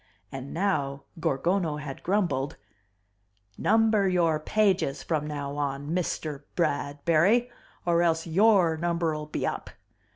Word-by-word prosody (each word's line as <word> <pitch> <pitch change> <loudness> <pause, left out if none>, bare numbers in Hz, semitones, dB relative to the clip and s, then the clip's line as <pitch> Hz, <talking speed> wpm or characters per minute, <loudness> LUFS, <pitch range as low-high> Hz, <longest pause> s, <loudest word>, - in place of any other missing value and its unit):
And 135 0 -7
now 140 -7 -1 0.2
Gorgono 160 +2 0
had 140 -2 -7
grumbled, 170 -9 0 1.0
"Number 215 - +3
your 165 -4 +2
pages 190 -4 +1
from 150 -2 -1
now 145 -1 -4
on, 145 +1 -2
MISTER 155 -5 -2
Bradbury 170 +9 +2 0.3
or 170 -1 +3
else 165 -1 +1
YOUR 180 -1 +4
number'll 165 -2 -1
be 150 - -3
up. - - -3
165 Hz, 110 wpm, -27 LUFS, 145-185 Hz, 1.0 s, YOUR